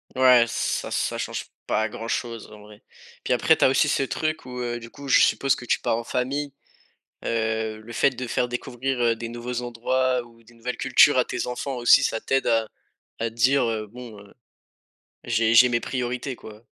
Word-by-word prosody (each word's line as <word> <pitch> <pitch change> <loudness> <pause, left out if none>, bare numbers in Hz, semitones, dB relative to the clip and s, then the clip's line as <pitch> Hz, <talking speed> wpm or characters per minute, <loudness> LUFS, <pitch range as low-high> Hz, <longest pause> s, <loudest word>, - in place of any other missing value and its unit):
Ouais, 125 -2 +6
ça 115 - -2
ça - - -1
change - - -4 0.2
pas 110 0 +1
grand-chose, 115 +1 -5
en 105 - -13
vrai. 105 0 -15 0.4
Puis - - -4
après - - +4
tu - - 0
as - - +5
aussi 135 +3 +3
ce 140 - +1
truc 155 +3 -2
où, 125 0 -7
heu, 120 -1 -3
du 115 0 -11
coup 140 +2 -11
je - - +5
suppose 135 -1 +3
que 120 - -9
tu - - +1
pars 115 - 0
en 115 - -4
famille, 135 +4 -2 0.7
heu, 110 -1 -1
le 115 +2 -11
fait 135 - +3
de 125 0 -6
faire 125 - 0
découvrir, 125 +1 -4
heu, 115 -1 +2
des 115 0 -6
nouveaux 120 +1 -5
endroits 125 +1 0
ou 115 -1 -19
des 120 +1 -19
nouvelles 120 +1 -5
cultures - - +5
à - - +4
tes - - -4
enfants 130 +2 -4
aussi 120 -1 +5
ça 115 - -1
t'aide 135 0 0
à 115 -1 +2 0.5
à 115 - -1
dire: 115 -2 +1
«Bon, 120 -1 -11 1.1
j'ai 115 -1 +1
j'ai 125 +2 +8
mes 120 -1 +1
priorités, 125 +1 -3
quoi». 110 0 -13
120 Hz, 195 wpm, -24 LUFS, 115-125 Hz, 1.1 s, j'ai